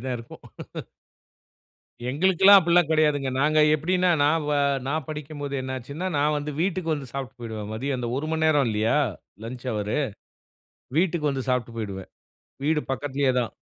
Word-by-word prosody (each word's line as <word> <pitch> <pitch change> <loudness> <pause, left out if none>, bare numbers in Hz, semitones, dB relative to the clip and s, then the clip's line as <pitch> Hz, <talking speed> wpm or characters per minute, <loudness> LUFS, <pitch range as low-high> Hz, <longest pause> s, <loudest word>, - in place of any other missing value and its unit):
அப்டிதான் 130 0 -3
இருக்கும். 115 - -12 1.7
எங்களுக்கெல்லாம் 190 +6 +6
அப்டில்லாம் 170 -2 +3
கிடையாதுங்க. 150 -4 +2
நாங்க 155 +1 +3 0.2
எப்டின்னா 180 +4 +1
நான் 155 +2 +2
வ - - +1 0.3
நான் 150 0 -2
படிக்கும்போது 145 -2 -5
என்ன 130 0 -4
ஆச்சுன்னா, 145 +9 -6
நான் 150 +1 +2
வந்து 145 +1 -3
வீட்டுக்கு 180 -3 0
வந்து 140 -4 -7
சாப்ட்டு 130 -3 -6
போய்டுவேன். 110 -3 -6
மதியம் 130 +4 -2
அந்த 120 -1 -3
1 155 +2 -4
மண்நேரம் 155 -4 +3
இல்லையா 110 +6 +1 0.5
லஞ்ச் 125 +2 -7
ஹவரு. 105 +4 -1 1.0
வீட்டுக்கு 170 -4 +1
வந்து 135 -1 -4
சாப்ட்டு 120 -2 -1
போய்டுவேன். 100 -4 -5 0.6
வீடு 155 0 +2
பக்கத்துலயே 140 -1 0
தான். 120 - -2
145 Hz, 145 wpm, -25 LUFS, 125-160 Hz, 1.7 s, எங்களுக்கெல்லாம்